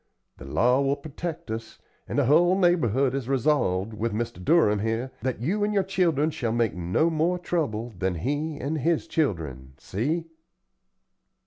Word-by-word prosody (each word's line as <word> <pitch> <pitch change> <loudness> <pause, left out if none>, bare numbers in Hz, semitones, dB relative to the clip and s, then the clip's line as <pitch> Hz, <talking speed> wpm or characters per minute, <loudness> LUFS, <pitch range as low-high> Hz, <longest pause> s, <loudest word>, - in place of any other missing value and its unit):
The 65 - -10
law 125 - +2
will 140 0 +2
protect 155 0 -6
us, 110 0 -6 0.3
an' - - -4
the 145 - +3
hull 175 +7 +4
neighborhood 140 - +2
has 135 -2 -3
resolved, 120 -7 +1
with 110 +1 -2
Mr. 105 -5 -4
Durham 105 - +4
here, 115 +4 -2
that 130 -3 -2
you 195 - 0
and 210 0 0
your 195 - +3
children 170 -5 +1
shall 120 -6 -2
make 115 -2 +1
no 90 - +1
more 165 +3 +1
trouble 120 -11 -2
than 95 0 -1
he 145 - -2
and 150 +4 -2
his 165 +3 +1
children. 80 - -2
See?" 155 - -2
135 Hz, 160 wpm, -26 LUFS, 110-160 Hz, 0.3 s, hull